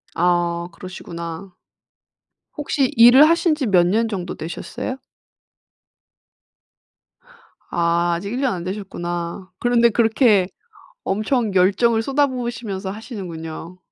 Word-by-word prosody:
아 175 Hz, 0 st, +1 dB
그러시구나. 170 Hz, 0 st, -8 dB, 1.0 s
혹시 280 Hz, -2 st, 0 dB
일을 245 Hz, +6 st, +8 dB
하신 335 Hz, -1 st, +2 dB
지 295 Hz, -3 st, -2 dB
몇 180 Hz, -4 st, +4 dB
년 225 Hz, +5 st, +1 dB
정도 185 Hz, -5 st, -4 dB
되셨어요? 175 Hz, +9 st, -6 dB, 2.7 s
아 170 Hz, 0 st, +1 dB
아직 200 Hz, +4 st, -5 dB
1 250 Hz, -, -2 dB
년 265 Hz, -6 st, +1 dB
안 175 Hz, -, -5 dB
되셨구나. 180 Hz, -1 st, -5 dB
그런데 240 Hz, -1 st, +3 dB
그렇게 225 Hz, -3 st, +3 dB, 0.6 s
엄청 215 Hz, +1 st, 0 dB
열정을 205 Hz, +5 st, +3 dB
쏟아 280 Hz, +4 st, +2 dB
부으시면서 230 Hz, -7 st, -4 dB
하시는군요. 180 Hz, -6 st, -8 dB
195 Hz, 230 characters per minute, -21 LUFS, 175-240 Hz, 2.7 s, 일을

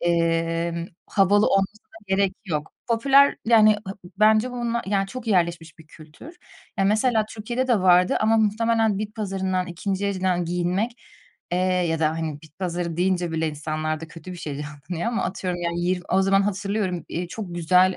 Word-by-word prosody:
emm, 165 Hz, 0 st, 0 dB, 0.2 s
havalı 205 Hz, +1 st, +3 dB
olmasına 195 Hz, +2 st, -1 dB, 0.2 s
gerek 195 Hz, 0 st, +1 dB
yok. 155 Hz, -5 st, -3 dB, 0.2 s
Popüler, 275 Hz, +4 st, +5 dB
yani, 215 Hz, -2 st, +6 dB
ha 190 Hz, -, -5 dB, 0.2 s
bence 215 Hz, +4 st, +4 dB
bununla, 235 Hz, -1 st, -2 dB
yani, 195 Hz, 0 st, +1 dB
çok 245 Hz, +4 st, -8 dB
yerleşmiş 170 Hz, -5 st, 0 dB
bir 160 Hz, -, -15 dB
kültür. 155 Hz, -, -14 dB, 0.4 s
Ya, 195 Hz, -, +3 dB
mesela 220 Hz, +2 st, +2 dB
Türkiye'de 240 Hz, +4 st, -3 dB
de 235 Hz, -4 st, +4 dB
vardı 180 Hz, 0 st, +4 dB
ama 220 Hz, +1 st, +3 dB
muhtemelen 220 Hz, 0 st, +2 dB
bit 210 Hz, 0 st, -5 dB
pazarından, 190 Hz, -3 st, -2 dB
2'nci 190 Hz, +3 st, -3 dB
elden 185 Hz, -3 st, 0 dB
giyinmek, 180 Hz, +7 st, -1 dB, 0.6 s
eee, 175 Hz, -, +2 dB
ya 180 Hz, -3 st, +1 dB
da, 155 Hz, -1 st, +3 dB
hani, 160 Hz, -2 st, -4 dB
bit 155 Hz, -1 st, -18 dB
pazarı 175 Hz, -3 st, -3 dB
deyince 180 Hz, -1 st, +1 dB
bile 160 Hz, 0 st, 0 dB
insanlarda 155 Hz, +1 st, -3 dB
kötü 165 Hz, +3 st, -10 dB
bir -, -, -8 dB
şey 155 Hz, -4 st, -5 dB
canlanıyor 150 Hz, +6 st, -5 dB
ama 230 Hz, -, 0 dB
atıyorum, 180 Hz, -1 st, -3 dB
yani, 170 Hz, 0 st, -2 dB
yir 180 Hz, +1 st, 0 dB
o 190 Hz, +1 st, +3 dB
zaman 195 Hz, +1 st, +3 dB
hatırlıyorum, 195 Hz, -3 st, -2 dB
eee, 175 Hz, +1 st, -4 dB
çok 180 Hz, -2 st, -6 dB
güzel 180 Hz, +2 st, +3 dB
185 Hz, 165 wpm, -24 LUFS, 170-215 Hz, 0.6 s, yani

